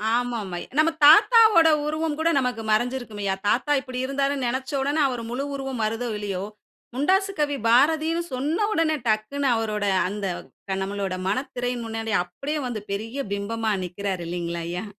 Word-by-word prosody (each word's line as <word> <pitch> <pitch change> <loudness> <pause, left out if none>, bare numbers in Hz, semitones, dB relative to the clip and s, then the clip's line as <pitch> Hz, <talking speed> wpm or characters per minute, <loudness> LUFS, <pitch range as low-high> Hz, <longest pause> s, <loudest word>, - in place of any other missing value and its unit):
ஆமாம் 240 -5 -2
ஐ - - -5 0.2
நம்ம 320 +2 +4
தாத்தாவோடஉருவம் 320 -6 +5
கூட 325 +1 +2
நமக்கு 250 -3 -2
மறைஞ்சு 240 +4 +2
இருக்கும்யா. 205 -5 -3
தாத்தா 255 +7 +1
இப்டி 255 -2 -6
இருந்தாருன்னு 275 0 -1
நெனைச்ச 260 +3 -3
உடனே 285 +3 0
அவரு 245 -3 -4
முழு 265 +3 -2
உருவம் 270 -3 -4
வருதோ 225 +3 -2
இல்லையோ, 200 -3 -3 0.5
முண்டாசு 380 +8 +2
கவி 290 -1 +1
பாரதின்னு 315 +7 +3
சொன்ன 305 +11 0
உடனே 325 -4 +2
டக்ன்னு, 220 +6 0
அவரோட 215 -2 -1 0.2
அந்த 205 +1 -4 0.4
க 190 - 0
நம்மளோட 195 -1 -3
மனத்திரையின் 245 0 -2
முன்னாடி 225 -1 -3
அப்டியே 275 - -4
வந்து, 230 -4 -4
பெரிய 220 +6 -4 0.2
பிம்பமா 220 +2 -2
நிக்குறாரு 185 0 -4
இல்லைங்ளா? 170 -1 -3
ஐயா. 180 +4 -4
245 Hz, 150 wpm, -24 LUFS, 210-290 Hz, 0.5 s, தாத்தாவோடஉருவம்